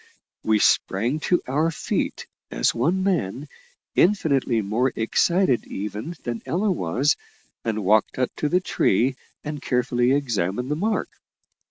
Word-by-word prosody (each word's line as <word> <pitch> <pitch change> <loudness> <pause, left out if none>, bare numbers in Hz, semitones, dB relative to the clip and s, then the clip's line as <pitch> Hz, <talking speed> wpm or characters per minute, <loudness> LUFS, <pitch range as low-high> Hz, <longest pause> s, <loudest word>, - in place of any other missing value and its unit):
We 110 -1 +3
sprang 115 +7 +2
to 180 - +3
our 150 +5 +1
feet 160 - -2 0.2
as - - +1
one 165 +11 +1
man, 150 - -1 0.5
infinitely 140 - +2
more 115 +6 +1
excited 135 +5 +2
even 105 - -5
than 120 -1 -4
Ella 190 +9 +1
was, 135 - +1 0.5
and 110 -3 -2
walked 105 +3 +3
up 130 -1 0
to 150 - 0
the 180 +3 +2
tree 130 - +1 0.3
and 150 -1 -5
carefully 125 0 +1
examined 125 -2 -1
the - - +1
mark. 210 +7 -1
130 Hz, 135 wpm, -24 LUFS, 110-160 Hz, 0.5 s, We